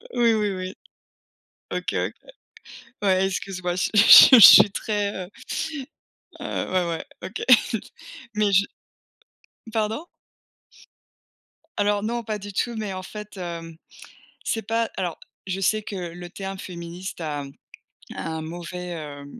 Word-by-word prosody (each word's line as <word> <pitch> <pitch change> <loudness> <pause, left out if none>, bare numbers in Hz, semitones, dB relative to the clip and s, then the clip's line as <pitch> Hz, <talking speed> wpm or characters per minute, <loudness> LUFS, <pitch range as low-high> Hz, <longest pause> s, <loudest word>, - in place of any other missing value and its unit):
Oui 235 -1 +4
oui 210 -2 0
oui. 185 +1 -6 1.0
OK - - -3
OK. - - -2 0.9
Ouais 190 -1 +2
excuse-moi, 185 -2 -3
je 185 - -1
suis - - +3
je 205 - +8
suis 255 -3 +11
je 195 - +12 0.2
suis 200 - -2
très 205 -1 -2
heu 180 - -16 1.1
heu - - -4
ouais 185 -1 +1
ouais 165 -1 -4 0.2
OK. 205 - -6 0.9
Mais 210 -1 +1
je 200 +1 +5 1.1
pardon? 220 +8 -2 1.7
Alors 205 0 +1
non, 235 +2 -2
pas 215 -1 -4
du 205 0 -9
tout, 235 +4 -1
mais 210 -3 -4
en 185 - -6
fait, 210 0 -10
hem, 165 -2 -7 0.7
c'est 225 - -2
pas 225 +1 -1
alors 175 -3 -3 0.3
je 190 0 -3
sais 215 +3 +1
que 205 - -7
le 175 -1 -7
terme 195 +1 -7
féministe 175 0 -8
a 145 -2 -3 0.7
a 165 - -5
un 160 0 -4
mauvais 175 +2 -7
heu 145 -3 -8
190 Hz, 140 wpm, -24 LUFS, 175-210 Hz, 1.7 s, je